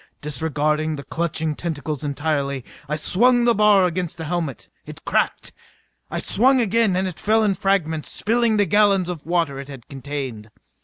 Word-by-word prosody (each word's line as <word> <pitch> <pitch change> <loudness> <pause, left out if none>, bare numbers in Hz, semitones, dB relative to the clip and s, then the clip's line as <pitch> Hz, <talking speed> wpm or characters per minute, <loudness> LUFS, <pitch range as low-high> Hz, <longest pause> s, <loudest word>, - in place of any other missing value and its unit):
Disregarding 150 +1 -1
the 140 - -7
clutching 160 -1 -2
tentacles 155 -3 -4
entirely, 140 -2 -2 0.2
I 150 - 0
swung 240 +10 +3
the 240 - +5
bar 210 -3 +5
against 175 -1 -2
the 160 - -5
helmet. 160 -5 -3 0.2
It - - -12
cracked. - - 0 0.6
I - - -4
swung 260 +5 +3
again 225 -3 +2
and 190 +1 0
it 180 - -7
fell 220 +1 +2
in 205 -2 +2
fragments, 175 -5 0
spilling 230 0 +1
the 205 - +3
gallons 195 -1 +3
of 165 -4 -6
water 165 -6 0
it 140 - -8
had 135 -4 -11
contained. 135 -5 -6
165 Hz, 165 wpm, -22 LUFS, 145-200 Hz, 0.6 s, the